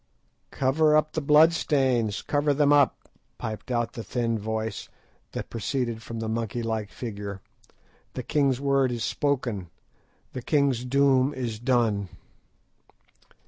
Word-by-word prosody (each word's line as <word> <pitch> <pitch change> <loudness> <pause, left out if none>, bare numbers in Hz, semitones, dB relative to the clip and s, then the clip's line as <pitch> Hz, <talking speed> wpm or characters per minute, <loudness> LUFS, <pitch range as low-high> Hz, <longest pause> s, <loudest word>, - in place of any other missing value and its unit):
"Cover 150 +3 +3
up 155 0 0
the 160 - -1
blood 150 +3 +6
stains, 130 - +1
cover 145 0 +1
them 145 0 +4
up," 145 -2 +3 0.3
piped 110 +3 -6
out 120 -2 -1
the 115 - -6
thin 115 -2 -1
voice 110 0 -4 0.4
that - - -5
proceeded 115 0 -2
from 115 0 -7
the 110 - -3
monkey 115 +1 -2
like 110 -2 -2
figure; 100 -3 -6 0.8
"the - - -4
king's 140 -4 +1
word 140 -2 +2
is 120 -2 -3
spoken, 120 - -1 0.6
the 130 - -5
king's 135 -3 +1
doom 135 +1 +3
is 120 -4 -4
done!" 115 -6 +1
125 Hz, 135 wpm, -26 LUFS, 110-140 Hz, 0.8 s, blood